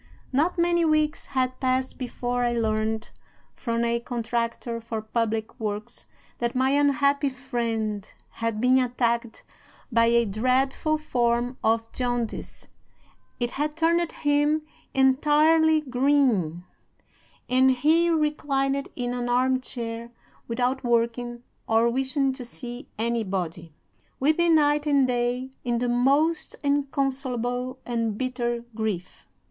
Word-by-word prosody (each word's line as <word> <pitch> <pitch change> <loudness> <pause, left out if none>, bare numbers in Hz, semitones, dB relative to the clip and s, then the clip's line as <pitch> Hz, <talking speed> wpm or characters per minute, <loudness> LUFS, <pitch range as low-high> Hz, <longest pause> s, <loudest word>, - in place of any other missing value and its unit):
Not 320 +7 +2
many 345 0 +3
weeks 310 -1 +1
had 255 -1 -1
passed 260 0 0
before 245 -1 -2
I 240 0 +1
learned, 220 -1 -1 0.4
from 235 -1 -1
a 235 0 +1
contractor 235 0 -3
for 225 -1 -4
public 220 +1 -2
works, 215 +1 -4 0.3
that 235 0 -1
my 260 +1 +2
unhappy 280 0 +3
friend 230 -6 -3 0.2
had 230 -2 -3
been 255 +2 +4
attacked 235 -2 -1 0.5
by 230 0 +4
a 235 0 +4
dreadful 255 +8 +1
form 245 -4 0
of 225 0 +1
jaundice; 245 -2 -3 0.7
it 240 0 -1
had 300 +2 -2
turned 335 +1 +2
him 295 +1 +1 0.3
entirely 305 +4 +4
green, 250 - +1 0.8
and 260 +1 +4
he 310 +7 +3
reclined 280 -3 0
in 245 -1 -2
an 245 -1 -2
arm 255 +1 +2
chair 235 -2 -5 0.4
without 250 +3 -1
working 240 0 0 0.2
or 225 +1 +3
wishing 270 +2 0
to 260 -1 -7
see 245 +2 -7
anybody, 190 -8 -2 0.5
weeping 320 +4 +3
night 295 0 +3
and 280 -2 +4
day 250 +1 -1
in 240 -1 0
the 245 +1 0
most 280 +7 +2
inconsolable 265 -3 -1
and 230 -3 -1
bitter 240 -2 -2
grief. 215 -5 -4
250 Hz, 120 wpm, -25 LUFS, 235-280 Hz, 0.8 s, been